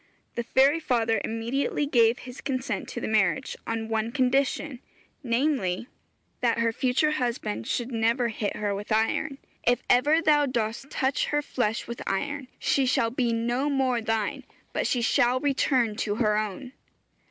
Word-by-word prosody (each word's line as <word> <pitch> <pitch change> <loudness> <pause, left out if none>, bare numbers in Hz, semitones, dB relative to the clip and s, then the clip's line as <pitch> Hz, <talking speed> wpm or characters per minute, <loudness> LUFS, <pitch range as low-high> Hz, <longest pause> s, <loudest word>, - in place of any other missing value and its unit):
The 235 - -2
fairy 270 +6 +3
father 230 -6 +1
immediately 235 +6 -1
gave 235 -4 +4
his 250 0 -10
consent 260 -2 -3
to - - -5
the - - -3
marriage, 220 +5 +1
on 225 -1 -2
one 225 0 -1
condition, 270 +1 0 0.4
namely, 240 -5 0 0.5
that 235 -2 +1
her 230 0 +2
future 265 +5 +2
husband 240 - -2
should 240 +1 -2
never 235 +1 +1
hit 210 -2 -3
her 205 -1 -1
with 205 +3 -6
iron. 225 +6 +1 0.3
'If 245 +1 +2
ever 290 +6 +4
thou 295 -3 +3
dost 235 +1 -2
touch 265 -1 0
her 295 0 0
flesh 225 -5 -1
with 235 0 -6
iron 280 +7 -2
she 270 -2 +1
shall 230 -2 +2
be 245 -1 0
no 240 +5 0
more 260 -4 +1
thine, 225 +5 -1 0.3
but - - 0
she 245 -2 0
shall 245 +2 +3
return 260 -5 +1
to 210 -4 -1
her 215 -2 +2
own.' 215 +4 -3
245 Hz, 160 wpm, -26 LUFS, 225-270 Hz, 0.5 s, gave